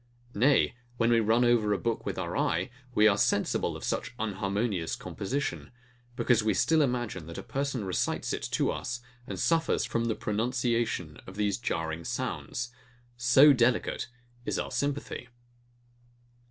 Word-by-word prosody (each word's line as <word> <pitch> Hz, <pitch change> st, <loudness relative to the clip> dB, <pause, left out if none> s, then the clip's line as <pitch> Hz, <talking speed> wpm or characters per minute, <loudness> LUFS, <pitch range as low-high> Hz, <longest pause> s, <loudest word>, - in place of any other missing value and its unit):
Nay, 130 Hz, +6 st, +4 dB, 0.2 s
when 115 Hz, 0 st, +3 dB
we 115 Hz, -, +5 dB
run 115 Hz, +2 st, +3 dB
over 115 Hz, -3 st, +3 dB
a -, -, +1 dB
book 115 Hz, +2 st, -2 dB
with -, -, -2 dB
our -, -, -3 dB
eye, 90 Hz, +6 st, 0 dB, 0.2 s
we 105 Hz, +1 st, +6 dB
are 100 Hz, -1 st, +3 dB
sensible -, -, +1 dB
of -, -, -11 dB
such 120 Hz, -, -2 dB
unharmonious 100 Hz, -3 st, -1 dB
composition; 135 Hz, +8 st, -3 dB, 0.5 s
because 120 Hz, -2 st, +3 dB
we 110 Hz, -2 st, +2 dB
still 160 Hz, +7 st, +3 dB
imagine, 120 Hz, -, -1 dB
that 85 Hz, -, -8 dB
a -, -, -5 dB
person 135 Hz, -5 st, -2 dB
recites 95 Hz, -, -1 dB
it -, -, -3 dB
to -, -, +2 dB
us, 120 Hz, -1 st, -4 dB, 0.3 s
and 95 Hz, -3 st, -5 dB
suffers 165 Hz, -1 st, +2 dB
from 115 Hz, 0 st, -1 dB
the 115 Hz, -2 st, 0 dB
pronunciation 115 Hz, -, -1 dB
of 95 Hz, -, -9 dB
these 105 Hz, -1 st, 0 dB
jarring 80 Hz, -7 st, -2 dB
sounds. 120 Hz, +7 st, -3 dB, 0.4 s
So 120 Hz, +5 st, +7 dB
delicate 120 Hz, -1 st, +1 dB, 0.4 s
is -, -, -2 dB
our -, -, -3 dB
sympathy! 140 Hz, -3 st, -2 dB
115 Hz, 155 wpm, -29 LUFS, 100-125 Hz, 0.5 s, So